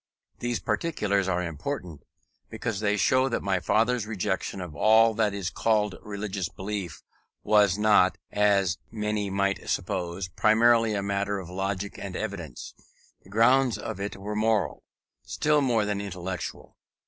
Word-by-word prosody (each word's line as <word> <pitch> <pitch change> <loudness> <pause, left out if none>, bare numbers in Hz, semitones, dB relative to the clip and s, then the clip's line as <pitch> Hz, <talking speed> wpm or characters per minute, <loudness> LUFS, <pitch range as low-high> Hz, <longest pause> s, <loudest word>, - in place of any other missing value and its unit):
These 120 -1 -1
particulars 100 - 0
are 90 -1 0
important, 85 - -5 0.5
because 110 -2 -3
they 105 -1 +1
show 130 +9 +3
that 115 - -2
my 100 -1 +1
father's 115 0 +1
rejection 100 -2 -2
of 90 -5 -7
all 110 +5 +5
that 110 -1 +1
is 100 -2 -3
called 105 -3 +1
religious 100 -3 -4
belief, 95 -4 -5 0.4
was 105 -3 +4
not, 105 -3 +4
as 100 -4 +2
many 105 -2 -2
might 100 0 -1
suppose, 90 -1 -2
primarily 110 +3 +3
a 100 - -1
matter 100 0 -1
of 90 -2 -7
logic 95 +1 -3
and 95 -2 -6
evidence: 90 - -6 0.5
the - - -19
grounds 125 +4 +4
of - - -6
it 100 0 -4
were 105 +2 -5
moral, 110 -1 +1 0.4
still 150 -1 +1
more 120 -6 +2
than 105 -1 -2
intellectual. 95 -3 -6
100 Hz, 145 wpm, -27 LUFS, 95-110 Hz, 0.5 s, all